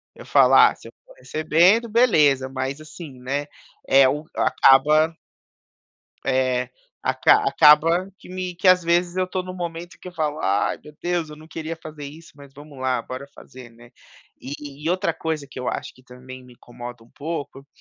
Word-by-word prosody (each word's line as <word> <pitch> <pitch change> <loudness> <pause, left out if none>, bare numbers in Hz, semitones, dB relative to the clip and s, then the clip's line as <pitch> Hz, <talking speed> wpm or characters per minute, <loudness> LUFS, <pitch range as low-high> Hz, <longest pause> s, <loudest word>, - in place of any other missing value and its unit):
eu - - -13
falar - - +5
se - - -15
eu - - -14
for - - -17
recebendo 180 - +2
beleza 150 - +3
mas 135 +2 -4
assim, 155 -3 -11
né, 140 +3 -3 0.4
é 135 -1 +6
o 150 +3 -3
acaba 150 +4 +4 1.1
é 130 -1 0 0.3
aca 420 +1 +3
acaba 165 +5 +4
que - - -16
me 185 -1 -5
que 185 +2 +1
às 185 0 +6
vezes 175 +1 +1
eu 185 - +1
estou 185 0 -4
num 185 0 -8
momento 175 -1 -7
que - - -9
eu - - -11
falo: 155 -3 -2
"Ai, 100 +1 0
meu 150 - -13
Deus 175 -3 -2
eu 150 - -10
não 155 +1 -15
queria 165 0 -6
fazer 155 -2 -10
isso, 155 +3 -12
mas, 140 -1 -15
vamos 145 -1 -13
lá 130 -1 0
bora 130 +3 -8
fazer, 125 -2 -13
né." 120 +1 -18 0.5
E 145 +1 -9
e 165 - 0
outra 180 -2 0
coisa 160 -3 -4
que - - -9
eu 125 - -3
acho - - -5
que 130 - -21
também 130 0 -12
me 125 - -16
incomoda 120 0 -11
um 115 - -24
pouco, 145 -3 -7
150 Hz, 185 wpm, -22 LUFS, 130-170 Hz, 1.1 s, é